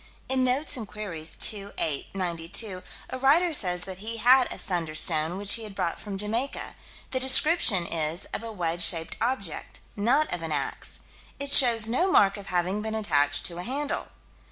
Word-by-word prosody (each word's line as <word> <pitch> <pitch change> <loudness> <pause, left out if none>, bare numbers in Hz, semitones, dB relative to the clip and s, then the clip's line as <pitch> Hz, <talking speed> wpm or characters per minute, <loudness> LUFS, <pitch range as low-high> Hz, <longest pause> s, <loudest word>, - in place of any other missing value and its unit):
In 260 -1 +1
Notes 265 +3 +1
and 220 -4 -7
Queries, 180 -7 -5
2 200 -1 0
8 150 +4 -3
92, 180 +2 -1 0.3
a 260 - -5
writer 320 +6 +2
says 180 -9 +1
that 190 -1 -9
he 225 +3 -5
had 250 +3 +4
a - - -3
"thunderstone," 165 -1 -1
which 200 0 +4
he 230 - +1
had 210 -3 -9
brought 170 - -3
from 200 -2 -7
Jamaica. 225 +7 -4 0.4
The 260 - -1
description 260 - +5
is 165 0 -2
of - - -4
a 230 0 -7
wedge 175 -4 -3
shaped 165 -2 +2
object; 225 - -3 0.2
not 245 +8 0
of 175 - -4
an 165 -1 -6
ax: 150 - -3 0.4
"It 280 0 -3
shows 235 -6 +7
no 345 +12 0
mark 195 - +4
of 200 -2 -10
having 180 +3 -2
been 220 0 -5
attached 145 -9 +1
to 175 -1 -3
a - - -5
handle." 285 +5 -4
205 Hz, 180 wpm, -25 LUFS, 175-250 Hz, 0.4 s, shows